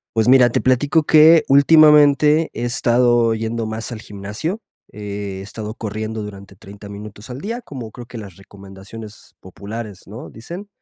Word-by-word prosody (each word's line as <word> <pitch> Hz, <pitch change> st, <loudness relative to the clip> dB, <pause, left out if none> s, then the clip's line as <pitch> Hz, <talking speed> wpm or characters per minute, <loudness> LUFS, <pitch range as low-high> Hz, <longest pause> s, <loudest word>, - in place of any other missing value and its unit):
Pues 110 Hz, +1 st, +1 dB
mira, 125 Hz, -1 st, +6 dB
te -, -, -1 dB
platico 145 Hz, +5 st, +1 dB
que 155 Hz, +1 st, +6 dB
últimamente 150 Hz, +1 st, +5 dB
he -, -, -5 dB
estado 120 Hz, -1 st, +2 dB
yendo 115 Hz, 0 st, -4 dB
más 110 Hz, +2 st, -6 dB
al 110 Hz, -2 st, -7 dB
gimnasio, 105 Hz, -, -6 dB, 0.3 s
he 100 Hz, -2 st, -7 dB
estado 105 Hz, +2 st, -8 dB
corriendo 110 Hz, 0 st, -5 dB
durante 100 Hz, -1 st, -11 dB
30 100 Hz, +2 st, -13 dB
minutos 105 Hz, +1 st, -11 dB
al 125 Hz, +2 st, -7 dB
día, 230 Hz, +4 st, -5 dB
como 125 Hz, -, -9 dB
creo 120 Hz, -1 st, -11 dB
que 120 Hz, -, -10 dB
las 100 Hz, -5 st, -10 dB
recomendaciones 100 Hz, +2 st, -13 dB
populares, 100 Hz, +2 st, -9 dB
¿no?, 110 Hz, +5 st, -10 dB
dicen. 175 Hz, -, -10 dB
115 Hz, 155 wpm, -19 LUFS, 105-135 Hz, 0.3 s, mira